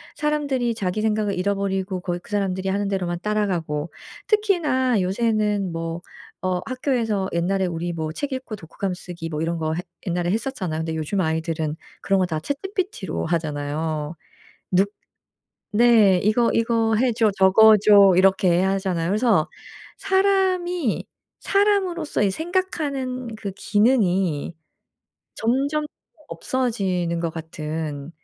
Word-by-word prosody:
사람들이 285 -5 0
자기 195 0 -2
생각을 215 -2 0
잃어버리고 195 0 -1
거기 175 -1 -3
그 175 - -18
사람들이 190 -2 -1
하는 200 +1 0
대로만 180 -3 -2
따라가고 175 -8 -1 0.4
특히나 300 - +2
요새는 210 0 0
뭐 165 +1 -4 0.4
어 185 -1 +1
학교에서 235 -7 -1
옛날에 185 +3 +1
우리 170 0 -3
뭐 160 -1 -3
책 280 - -3
읽고 260 -4 -5
독후감 190 +1 -5
쓰기 175 -2 -7
뭐 155 -1 -3
이런 170 +1 -1
거 155 0 -1
했 175 - -4 0.2
옛날에 175 0 0
했었잖아요. 210 - -2
근데 160 0 -3
요즘 160 +5 -1
아이들은 160 -2 -1 0.3
그런 195 - +2
거 185 - +3
다 160 -3 -2
chatGPT로 320 - -3
하잖아요. 155 -1 -2 0.6
눅 190 +2 +3 0.8
네. 215 -4 +5
"이거 230 +3 +3
이거 225 -1 +2
해 245 +2 +2
줘. 220 -2 +3
적어 215 +3 +7
줘. 200 -1 +7
이렇게 185 -2 +4
하잖아요." 190 -3 0
그래서 210 -6 +2 0.5
사람이 380 - +1 0.3
사람으로서 390 - +1
이 200 - +3
생각 355 - -2
하는 255 -5 -3
그 200 -2 -5
기능이 195 - +1 0.8
점점 280 +6 0 0.4
없어지는 190 -9 -1
것 165 -1 -1
같은 155 -2 -5
195 Hz, 300 characters per minute, -23 LUFS, 175-245 Hz, 0.8 s, 적어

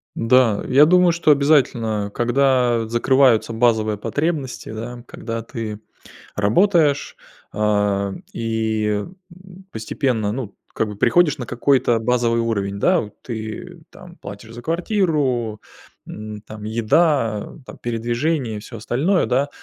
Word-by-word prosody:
Да, 115 -2 +3
я 135 +3 +6
думаю, 180 +1 +5
что 165 -2 +3
обязательно, 120 -8 +2
когда 120 -2 +2
закрываются 120 0 +3
базовые 110 -2 +1
потребности, 145 +4 -3
да. 120 +2 -7
Когда 115 0 -5
ты 110 -2 -6 0.6
работаешь, 145 - +2 0.4
а, 105 -2 0 0.2
и, 110 -2 -1 0.3
м, 185 +1 -15
постепенно, 110 -1 -1
ну, 115 -4 -5 0.2
как 110 - -1
бы 105 - -7
приходишь 150 - +3
на 130 - -5
какой-то 120 -1 +2
базовый 115 0 +1
уровень, 100 -4 -2
да. 180 - +3
Вот 105 -2 -8
ты 115 +10 -7
там 180 -2 -14
платишь 105 +3 -10
за 120 - -9
квартиру, 150 - 0 0.5
м, 105 0 -8
там 110 -1 -11
еда, 115 0 +1
там - - -10
передвижения 120 +2 -2
и - - -5
всё 115 +2 -10
остальное, 145 - +1
да. 135 +3 +1
120 Hz, 125 wpm, -21 LUFS, 110-145 Hz, 0.6 s, я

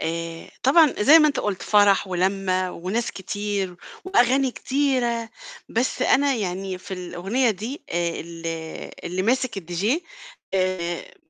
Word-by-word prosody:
آآ 165 0 -4
طبعًا 300 +2 +5
زي 290 +10 +8
ما 305 -1 +5
أنت 285 - -1
قُلت 200 -3 -2
فرَح 205 -2 +4
ولَمّة 185 0 0
وناس 195 +7 -2
كتير 200 -1 -3 0.3
وأغاني 270 -7 +3
كتيرة، 250 -4 0 0.4
بس 240 +3 -1
أنا 280 0 +3
يعني 190 -3 -3
في 190 - -7
الأغنية 195 +7 0
دي 220 +8 -5
آآ 170 0 -1
ال 165 0 -8 0.6
اللي 180 +2 -2
ماسِك 245 0 0
الDJ 175 +2 -3 0.7
آآ 185 -2 -1
195 Hz, 130 wpm, -23 LUFS, 180-250 Hz, 0.7 s, زي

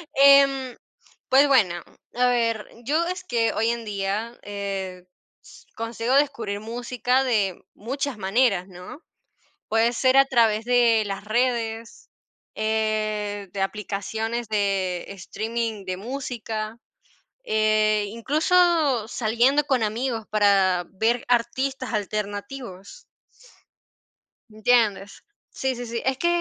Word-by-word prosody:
Em, 275 -2 +5 0.5
pues, 275 +2 +6
bueno, 190 -10 +3 0.3
a 250 0 +3
ver, 230 -3 0 0.2
yo 315 +5 +1
es 365 +1 -4
que 230 -6 +1
hoy 225 +1 +1
en 235 0 -2
día, 205 +3 -3
eh, 195 -3 -5 0.7
consigo 230 +2 -2
descubrir 235 -8 0
música 245 +3 -1
de 205 -7 0
muchas 270 +3 -4
maneras, 195 -1 +1
¿no? 180 - -11 0.7
Puede 225 +2 +2
ser 255 +2 +2
a 275 - +8
través 225 -4 +2
de 235 -2 +3
las 195 0 -5
redes, 230 0 -2 0.5
eh, 215 -2 -1
de 195 - -5
aplicaciones 220 +3 -3
de 195 -4 0
streaming 220 +2 -4
de 185 -1 -4
música, 225 -2 -5 0.7
eh, 215 - +2
incluso 300 - +2
saliendo 245 +6 +2
con 265 -5 +1
amigos, 225 +1 -2
para 195 -4 +3
ver 225 +5 0
artistas 255 +2 -1
alternativos. 210 - -5 1.5
¿Entiendes? 215 -3 +1 0.3
Sí, 265 -1 -2
sí, 245 0 -6
sí. 235 0 -4
Es 265 0 +1
que 345 - 0
225 Hz, 110 wpm, -24 LUFS, 205-250 Hz, 1.5 s, a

